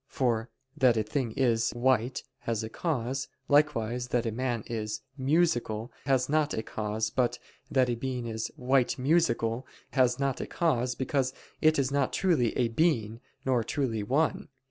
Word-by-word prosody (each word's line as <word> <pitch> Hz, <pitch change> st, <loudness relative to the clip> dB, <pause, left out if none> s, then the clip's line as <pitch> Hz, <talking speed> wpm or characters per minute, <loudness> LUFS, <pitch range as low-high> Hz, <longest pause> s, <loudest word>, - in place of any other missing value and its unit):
For 120 Hz, -4 st, 0 dB, 0.3 s
(that 125 Hz, -5 st, +4 dB
a 110 Hz, -, +2 dB
thing 115 Hz, +2 st, -2 dB
is) 115 Hz, -3 st, +2 dB
"white" 125 Hz, 0 st, +1 dB, 0.2 s
has 115 Hz, -1 st, -2 dB
a 110 Hz, -, -4 dB
cause, 135 Hz, -2 st, -2 dB, 0.2 s
likewise 125 Hz, -5 st, +2 dB
(that 120 Hz, -1 st, 0 dB
a 115 Hz, -, 0 dB
man 120 Hz, -1 st, -2 dB
is) 110 Hz, -2 st, -4 dB
"musical" 130 Hz, -6 st, +1 dB, 0.2 s
has 130 Hz, -2 st, +3 dB
not 150 Hz, 0 st, +1 dB
a 110 Hz, -, -2 dB
cause, 110 Hz, 0 st, -2 dB
but 125 Hz, -2 st, +1 dB, 0.3 s
(that 130 Hz, -2 st, +3 dB
a 120 Hz, -, 0 dB
being 125 Hz, 0 st, -3 dB
is) 110 Hz, -1 st, -3 dB
"white 130 Hz, +1 st, +2 dB
musical" 130 Hz, -4 st, +1 dB, 0.2 s
has 125 Hz, -1 st, +3 dB
not 140 Hz, -2 st, 0 dB
a -, -, -4 dB
cause, 130 Hz, -7 st, 0 dB
because 130 Hz, 0 st, 0 dB, 0.3 s
it 155 Hz, 0 st, +5 dB
is 135 Hz, -1 st, +1 dB
not 140 Hz, -2 st, +1 dB
truly 160 Hz, -, +2 dB
a 120 Hz, -2 st, +2 dB
being, 115 Hz, -5 st, +1 dB, 0.3 s
nor 125 Hz, -3 st, +2 dB
truly 120 Hz, -5 st, -1 dB
one. 140 Hz, +10 st, 0 dB
125 Hz, 165 wpm, -29 LUFS, 115-135 Hz, 0.3 s, it